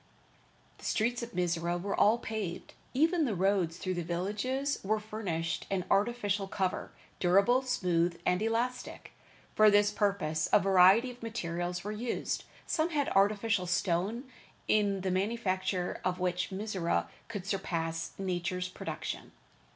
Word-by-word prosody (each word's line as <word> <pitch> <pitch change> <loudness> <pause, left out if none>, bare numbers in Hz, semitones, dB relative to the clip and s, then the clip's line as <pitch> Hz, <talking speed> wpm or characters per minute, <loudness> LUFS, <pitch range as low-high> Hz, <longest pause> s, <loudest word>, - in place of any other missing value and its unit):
The - - -11
streets 240 +2 +1
of 235 0 -6
Mizora 175 -1 0
were 200 +3 -2
all 215 +3 +5
paved, 215 -7 -5 0.2
even 320 +4 +3
the 225 -6 -1
roads 185 -3 +1
through 185 0 -2
the 175 - -2
villages 205 - -1
were 215 +2 +1
furnished 195 -7 -3
an 185 -2 -1
artificial 205 -2 +1
cover, 190 -1 -2 0.3
durable, 200 +8 +4
smooth 175 -9 0
and 180 +2 +2
elastic. 235 +3 -2 0.4
For 215 0 +6
this 205 0 +4
purpose 195 -7 0
a - - +7
variety 195 +6 +5
of 245 - -15
materials 175 -5 -3
were 205 - -3
used. 230 +3 -3 0.2
Some 320 0 +1
had 290 -4 0
artificial 205 -1 +2
stone, 185 +6 0 0.4
in 200 -2 +2
the 190 0 -1
manufacture 185 -2 -1
of 180 0 0
which 180 -1 -1
Mizora 190 -3 -1 0.2
could 205 -5 -6
surpass 165 -4 -2
nature's 180 -1 -2
production. - - -6
195 Hz, 135 wpm, -31 LUFS, 180-220 Hz, 0.4 s, a